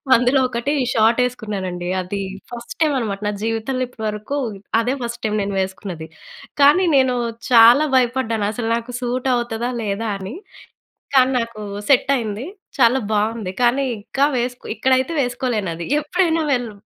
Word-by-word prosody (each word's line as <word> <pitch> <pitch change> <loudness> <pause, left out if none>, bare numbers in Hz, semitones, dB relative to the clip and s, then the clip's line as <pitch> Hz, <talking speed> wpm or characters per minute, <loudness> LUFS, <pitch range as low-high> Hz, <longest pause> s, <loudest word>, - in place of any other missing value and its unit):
అందులో 250 +3 +3
ఒకటి 240 +2 -2 0.2
షాట్ 225 +2 +3
ఏసుకున్నానండి. 195 -7 -4
అది 185 +2 -4 0.3
ఫస్ట్ 235 0 -8
టైం 310 -2 +3
అనమాట 205 -4 -3
నా - - +1
జీవితంలో 225 +3 -1
ఇప్పటివరకు 215 +2 -4 0.4
అదే 245 +3 0
ఫస్ట్ 235 0 -5
టైం 215 - 0
నేను 200 0 -2
వేసుకున్నది. 190 -3 -4 0.5
కానీ 290 +7 +6
నేను 260 -2 +3 0.4
చాలా 240 +5 +8
భయపడ్డాను. 240 -4 +1
అసలు 225 +1 -3
నాకు 235 +1 -5
సూట్ 250 +1 -2
అవుతదా? 240 0 -2
లేదా? 215 +1 -2
అని. 195 +6 -7 0.8
కానీ 260 0 +5
నాకు 230 -2 -5 0.3
సెట్ 270 0 +4
అయింది. 220 0 -4 0.3
చాలా 250 +1 +5
బావుంది. 215 -2 -1
కానీ 245 +3 +3 0.2
ఇంకా 270 +7 0
వేసుకో 245 +1 -3
ఇక్కడైతే 260 +4 +2
వేసుకోలేనది. 225 -9 -2
ఎప్పుడైనా 325 +1 +1
వెళ్ళు 245 -4 -2
235 Hz, 140 wpm, -20 LUFS, 215-255 Hz, 0.8 s, చాలా